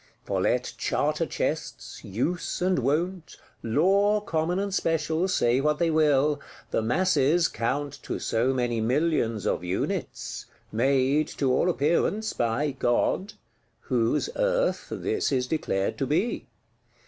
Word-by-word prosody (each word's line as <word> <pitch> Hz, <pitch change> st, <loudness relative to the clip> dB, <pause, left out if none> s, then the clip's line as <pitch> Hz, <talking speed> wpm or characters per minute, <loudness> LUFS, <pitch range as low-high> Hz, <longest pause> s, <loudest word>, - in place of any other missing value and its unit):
For -, -, -1 dB
let -, -, 0 dB
Charter -, -, 0 dB
Chests, -, -, -4 dB
Use 130 Hz, -, -2 dB
and 185 Hz, -3 st, +1 dB
Wont, 160 Hz, +7 st, -1 dB, 0.2 s
Law 195 Hz, -, +3 dB
common 170 Hz, -3 st, -1 dB
and 200 Hz, 0 st, -2 dB
special 165 Hz, 0 st, 0 dB
say 125 Hz, -8 st, +2 dB
what 150 Hz, +1 st, +1 dB
they 170 Hz, 0 st, +1 dB
will, 150 Hz, -2 st, +3 dB, 0.3 s
the -, -, +1 dB
masses 160 Hz, +5 st, +2 dB
count 140 Hz, +5 st, -3 dB
to -, -, -4 dB
so 115 Hz, +3 st, 0 dB
many 120 Hz, -3 st, 0 dB
millions 120 Hz, -, 0 dB
of -, -, 0 dB
units; 90 Hz, +1 st, -3 dB, 0.2 s
made, 135 Hz, +5 st, +2 dB
to 135 Hz, -3 st, 0 dB
all 175 Hz, -, +2 dB
appearance, 175 Hz, +7 st, +1 dB
by 120 Hz, +6 st, 0 dB
God,—whose 120 Hz, -, -1 dB
Earth -, -, 0 dB
this 420 Hz, -, -1 dB
is 130 Hz, -2 st, +1 dB
declared 125 Hz, -9 st, -1 dB
to 135 Hz, -, 0 dB
be. 180 Hz, -, 0 dB
150 Hz, 125 wpm, -26 LUFS, 125-180 Hz, 0.3 s, Law